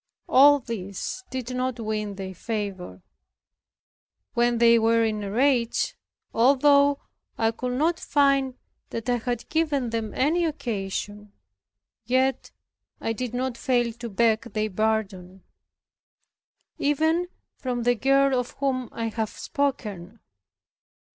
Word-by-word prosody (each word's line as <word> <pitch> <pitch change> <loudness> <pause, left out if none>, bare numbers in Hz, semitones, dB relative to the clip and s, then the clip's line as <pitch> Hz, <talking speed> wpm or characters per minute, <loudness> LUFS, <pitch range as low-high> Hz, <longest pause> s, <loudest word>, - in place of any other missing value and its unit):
All 285 +2 +7
this 230 - -5
did 255 -1 -4
not 255 -1 -2
win 215 -2 -3
their 190 -1 -6
favor. 190 - -5 1.3
When 240 0 +2
they 235 0 +6
were 230 +1 +3
in 215 -1 -1
a 200 - -4
rage, 245 +1 +1 0.4
although 280 +3 +4 0.4
I 225 0 +2
could 250 +2 -4
not 320 +6 +1
find 275 -3 +2 0.3
that 230 0 -5
I 245 -1 +2
had 240 0 -3
given 295 -7 0
them 225 -2 -2
any 320 +6 +2
occasion, 210 - -4 0.7
yet 260 +3 +1 0.5
I 225 - -2
did 245 +1 -4
not 255 -1 -2
fail 240 -3 +1
to 235 0 -7
beg 225 +2 +1
their 215 0 -1
pardon, 190 -3 -2 1.4
even 315 +5 +1 0.3
from 245 -2 -3
the 245 +1 +4
girl 270 +2 +3
of 250 - -5
whom 255 -3 -1
I 230 -1 -3
have 220 -1 -2
spoken. 225 - -3
235 Hz, 120 wpm, -25 LUFS, 220-270 Hz, 1.4 s, All